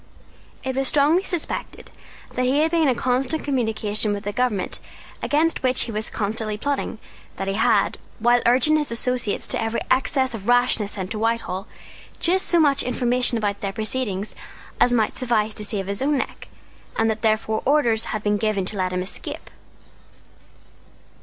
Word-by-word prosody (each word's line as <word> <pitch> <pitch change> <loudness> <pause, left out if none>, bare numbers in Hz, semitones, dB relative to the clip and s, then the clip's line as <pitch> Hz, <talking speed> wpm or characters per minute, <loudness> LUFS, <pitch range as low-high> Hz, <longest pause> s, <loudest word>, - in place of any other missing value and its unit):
It 260 -1 -3
was 270 0 +1
strongly 300 +6 +4
suspected 350 -4 -5 0.4
that 255 - 0
he 275 +4 +2
had 320 +1 +2
been 330 -3 +3
in 255 - +3
constant 260 +5 0
communication 220 -5 0
with 205 0 -5
the 205 - -3
government 225 -4 0 0.4
against 315 +3 +1
which 255 -1 +2
he 230 - -2
was 215 0 +1
constantly 215 0 -2
plotting, 280 0 -2 0.4
that 195 - -3
he 195 - 0
had, 220 -1 +2 0.2
while 240 +2 +3
urging 260 +6 +4
his 295 -5 +2
associates 235 -2 0
to - - -1
every 225 +1 -1
excess 260 0 +3
of 210 -2 -7
rashness 245 -4 +3
sent 190 -3 -5
to 215 - -3
Whitehall 225 -4 -1 0.5
just 375 +2 +2
so 345 - +4
much 285 -3 +3
information 250 -1 +1
about 205 -2 -2
their 195 - -2
proceedings 215 -2 -2 0.4
as 245 - +5
might 225 -3 +1
suffice 220 -4 +1
to 210 - -5
save 205 -2 -2
his 200 +3 -3
own 290 +1 +2
neck, - - -5 0.5
and 225 - +2
that 220 -1 -1
therefore 220 -1 +1
orders 240 -6 +2
had 215 -2 -4
been 210 0 +1
given 205 -3 0
to 205 - -4
let 185 -1 0
him 180 0 -1
escape. 185 - -5
230 Hz, 170 wpm, -23 LUFS, 210-260 Hz, 0.5 s, as